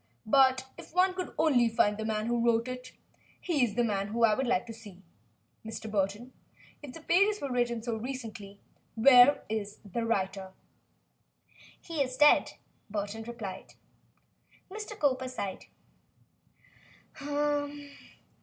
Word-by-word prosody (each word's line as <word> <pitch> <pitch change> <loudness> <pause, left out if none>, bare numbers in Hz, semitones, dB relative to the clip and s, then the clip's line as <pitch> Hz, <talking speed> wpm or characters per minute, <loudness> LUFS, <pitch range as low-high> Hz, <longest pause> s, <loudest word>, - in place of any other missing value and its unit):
But 260 +2 +4
if - - -13
one 370 +1 +4
could 365 -1 -5
only 255 -7 +3
find 210 -2 +2
the 220 +1 -5
man 215 -1 -1
who 235 0 0
wrote 230 0 +2
it! 255 0 -7 0.5
He 315 -7 0
is 215 -4 -1
the 240 - +2
man 205 0 -2
I 225 -2 +4
should 265 +2 -2
like 245 0 +1
to 230 - -8
see, 205 -4 -14 0.6
Mr. 220 0 -7
Burton. 205 +5 -2 0.5
If 285 -4 -9
the 330 - -10
pages 400 +5 +3
were 280 - -4
written 240 -2 -1
so 230 -2 -2
recently, 220 -5 -7 0.4
where 250 +4 +6
is 210 -1 -4
the 230 +4 -3
writer?" 190 -4 -2 1.3
"He 330 -4 -4
is 255 -2 -2
dead," 295 +1 +5 0.4
Burton 205 +1 -4
replied. 220 -5 -8 1.0
Mr. 425 0 -7
Cowper 260 -3 +1
sighed. 200 -6 -5
235 Hz, 135 wpm, -29 LUFS, 215-265 Hz, 1.3 s, where